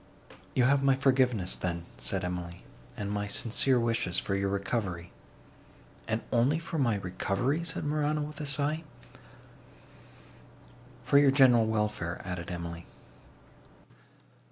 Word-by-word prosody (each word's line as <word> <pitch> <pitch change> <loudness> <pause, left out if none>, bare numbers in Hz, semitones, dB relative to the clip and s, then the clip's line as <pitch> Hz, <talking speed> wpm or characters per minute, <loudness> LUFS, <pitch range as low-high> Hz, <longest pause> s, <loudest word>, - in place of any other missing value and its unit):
"You 125 - +4
have 140 +2 +4
my 135 -1 +4
forgiveness, 130 -8 +2
then," 85 -2 -3
said 90 +11 -2
Emily, 90 -1 -5 0.3
"and 100 -1 -3
my 105 0 -2
sincere 125 +4 +2
wishes 115 -6 0
for 100 - -1
your 100 0 0
recovery." 100 -3 -2 1.0
"And 110 0 -1
only 125 +6 +3
for 165 -1 -4
my 120 -5 +2
recovery?" 100 - -1
said 170 - -3
Morano, 150 0 0
with 150 0 -6
a 150 - -4
sigh. 150 +3 -1 2.2
"For 140 - +5
your 145 -1 +6
general 130 -5 +5
welfare," 105 -6 -1
added 90 -1 -5
Emily. 85 -1 -6
115 Hz, 125 wpm, -29 LUFS, 90-140 Hz, 2.2 s, your